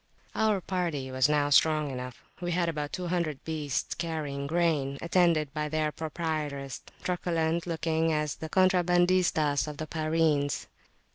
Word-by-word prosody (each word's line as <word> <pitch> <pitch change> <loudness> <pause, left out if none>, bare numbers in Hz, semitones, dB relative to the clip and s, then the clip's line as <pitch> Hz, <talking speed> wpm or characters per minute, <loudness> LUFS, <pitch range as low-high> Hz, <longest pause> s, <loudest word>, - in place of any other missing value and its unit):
Our 215 -3 +2
party 170 -8 -2
was 130 +2 +3
now 145 -1 +2
strong 155 -1 +4
enough. 125 -1 -7 0.2
We 175 -1 -1
had 175 0 +1
about 150 -2 -3
200 175 -5 -2
beasts 150 -4 -2
carrying 150 -4 -3
grain, 155 -4 +1
attended 170 -4 +2
by 150 -1 -2
their 155 0 0
proprietors, 150 -4 -3 0.2
truculent 170 -2 0
looking 165 -1 0
as 150 -1 -1
the 160 - -6
contrabandistas 175 -5 +3
of 150 -1 -6
the 155 - -4
Pyrenees. 155 -2 0
160 Hz, 135 wpm, -29 LUFS, 145-170 Hz, 0.2 s, strong